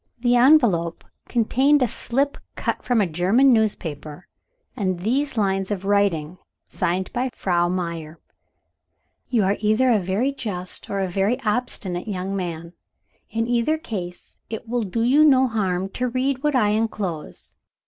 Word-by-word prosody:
The 245 0 +2
envelope 240 - +4 0.2
contained 265 +4 +3
a - - +2
slip 275 +6 -1 0.2
cut - - -2
from 245 -3 +1
a - - +3
German 190 - +3
newspaper, 165 -8 -2 0.5
and 185 -6 -2
these 260 +6 0
lines 195 -2 0
of 195 -2 -3
writing, 185 -5 +1 0.3
signed 185 +2 -2
by 255 +1 -1
Frau 175 -2 +1
Meyer: 170 -3 -4 1.1
"You 230 -5 +2
are 195 +2 +1
either 215 +4 +3
a 220 - +4
very 195 +9 0
just, 185 -9 -6
or 200 -1 -1
a 190 - 0
very 195 +6 0
obstinate 210 -5 -2
young 195 -1 -3
man. 170 -2 -5 0.6
In 225 0 -1
either 240 +6 +1
case, 185 - -7
it 225 +1 -6
will 240 +1 -1
do 225 +2 -2
you 275 +6 +5
no 265 -4 +5
harm 190 -5 -1
to 250 +5 -2
read 260 +2 -1
what 295 -1 +1
I 215 -5 +3
enclose. 210 -7 -3
210 Hz, 150 wpm, -23 LUFS, 180-245 Hz, 1.1 s, you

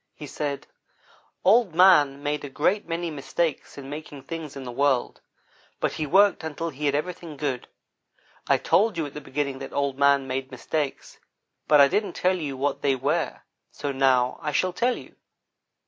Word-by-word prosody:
He 150 - -8
said: 145 0 -4 0.8
"Old 200 -3 +4
man 150 -7 +5
made 145 0 -2
a 145 - -6
great 180 +9 0
many 170 0 -3
mistakes 150 +1 -3
in 135 -1 -8
making 145 -1 -8
things 155 -1 -7
in 135 - -7
the 125 - -6
world, 135 0 0 0.6
but - - 0
he 155 - -3
worked 195 +3 +4
until 160 +1 -4
he 145 +2 -3
had 140 - +1
everything 165 0 -4
good. 135 -4 -3 0.8
I - - +4
told 210 -2 +2
you 160 - -1
at 145 - -8
the 150 - -7
beginning 140 -1 -3
that 135 - -8
Old 140 -1 -1
man 140 -1 +4
made 130 0 -3
mistakes, 140 +2 -4 0.5
but 150 - +6
I 140 - +8
didn't 205 +8 -1
tell 185 +1 +1
you 145 -6 -4
what 140 +1 -1
they 135 -2 +2
were, 130 - -1 0.3
so 145 - -4
now 130 -2 +2
I 150 -2 -2
shall 185 +4 +1
tell 245 +5 +1
you. - - -13
145 Hz, 180 wpm, -25 LUFS, 135-165 Hz, 0.8 s, I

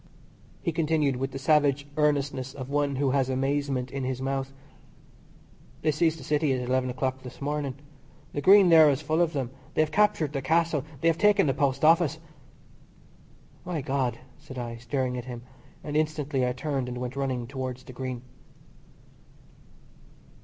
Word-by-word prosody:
He 170 - 0
continued 155 -4 +1
with 135 +1 -2
the 135 - -7
savage 145 0 +2
earnestness 140 -3 0
of 130 -1 -7
one 145 -1 +1
who 135 0 +1
has 135 -1 +1
amazement 135 -1 -1
in 135 -1 -4
his 130 0 -2
mouth: 135 0 -2 1.3
"They 155 - +3
seized 160 +1 +1
the 145 - -10
City 150 +1 +1
at 125 -1 -2
eleven 130 0 +1
o'clock 130 +1 -2
this 125 -1 -10
morning. 145 -2 -2 0.6
The 145 - -2
Green 195 +3 +7
there 160 -2 +8
is 140 +1 0
full 155 +3 +1
of 170 -1 +1
them. 130 -4 -2 0.2
They 155 - +4
have 155 - -4
captured 170 -8 +2
the 135 - -2
Castle. 160 0 +1 0.2
They 165 - +2
have 165 -1 +2
taken 205 -1 +5
the 135 - +2
Post 140 +1 +1
Office." 165 -1 +4 1.5
"My 175 -4 -3
God!" 130 -4 -1 0.2
said 145 -3 -11
I, 120 -1 -5
staring 125 +1 -2
at 120 - -8
him, 120 -2 -7 0.4
and 150 -1 -5
instantly 150 -4 0
I 125 - 0
turned 135 -1 -2
and 125 - -5
went 125 +1 -4
running 130 -3 -2
towards 130 0 -5
the 130 - -11
Green. 125 -1 -5
140 Hz, 170 wpm, -27 LUFS, 130-155 Hz, 1.5 s, there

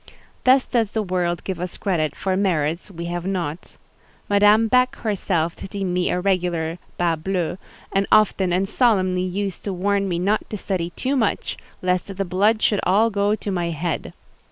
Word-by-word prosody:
Thus 260 +1 +5
does 230 -4 0
the 220 - 0
world 180 -2 -1
give 190 -3 -4
us 180 0 -5
credit 165 -6 -1
for 190 -1 -1
merits 170 -3 0
we 170 -3 -7
have 175 0 -3
not. 180 -4 -4 0.5
Madame 210 +2 +5
Beck 250 +2 +3
herself 180 -6 -1
deemed 195 -2 -4
me 180 0 +1
a 180 - 0
regular 175 -3 0 0.2
bas 170 -2 +1
bleu, 180 0 -2 0.3
and 195 0 +1
often 200 -3 +4
and 185 +2 +1
solemnly 190 -6 +2
used 190 +1 -3
to 200 - -2
warn 200 +2 0
me 175 - -1
not 200 +5 0
to 210 - -4
study 185 -3 -2
too 265 +2 -1
much, 225 -6 0 0.3
lest 180 +2 0
"the 195 - -1
blood 205 +5 +2
should 205 - +3
all 210 +5 +3
go 205 +1 +1
to 210 - -5
my 175 -2 -1
head." 165 0 -3
190 Hz, 180 wpm, -22 LUFS, 175-205 Hz, 0.5 s, Thus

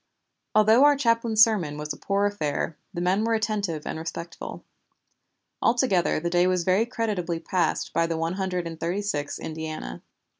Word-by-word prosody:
Although 220 +4 +6
our 290 0 +6
chaplain's 230 -4 +4
sermon 180 -10 +1
was 150 0 -4
a - - -9
poor 200 +5 0
affair, 165 -5 -2 0.2
the 175 -3 -4
men 185 +4 +2
were 230 0 +2
attentive 205 -8 -2
and - - -4
respectful. 170 +1 -7 1.0
Altogether 230 - +2
the 170 - -3
day 175 +1 +4
was 185 -1 +1
very 190 +6 +2
creditably 205 -8 -2
passed 170 0 -1
by 165 0 +2
the 165 -1 -2
One 165 +2 -1
Hundred 185 -2 -2
and 165 -1 -7
Thirty 180 +5 -2
sixth 145 -8 -2
Indiana. 155 - -6
185 Hz, 165 wpm, -26 LUFS, 165-215 Hz, 1.0 s, Although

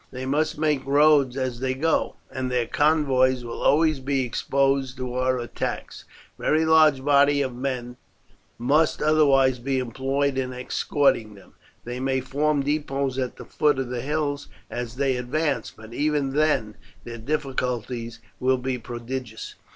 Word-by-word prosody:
They 130 0 -6
must 155 +4 0
make 150 -3 +1
roads 140 -2 +4
as 130 -3 -2
they 130 0 -1
go, 160 +4 0 0.2
and 130 -1 -3
their 125 -2 0
convoys 135 -5 +2
will 120 - -6
always 155 0 +3
be 135 0 0
exposed 135 +1 0
to 125 -1 -4
our 130 0 +1
attacks. 120 -1 -5 0.3
Very 160 +1 +2
large 155 -4 +4
bodies 140 0 +4
of 130 - -5
men 125 -1 -4 0.6
must 145 +7 +2
otherwise 135 -4 +4
be 135 +2 -1
employed 135 +2 -1
in 130 -1 -3
escorting 125 -3 0
them. 100 - -17 0.3
They 120 +1 -5
may 130 0 0
form 145 +2 0
depots 140 -2 -1
at 125 -1 -3
the - - -10
foot 150 -2 +1
of 130 -2 -3
the 125 -1 -3
hills 145 0 -2 0.2
as 120 0 -5
they 135 -1 0
advance, 145 +4 -1
but 110 +1 -13
even 145 -1 0
then 145 -8 +1 0.3
their 115 -1 -8
difficulties 125 -3 -3 0.2
will 130 +1 +2
be 125 0 -3
prodigious. 120 0 -6
135 Hz, 150 wpm, -24 LUFS, 125-145 Hz, 0.6 s, roads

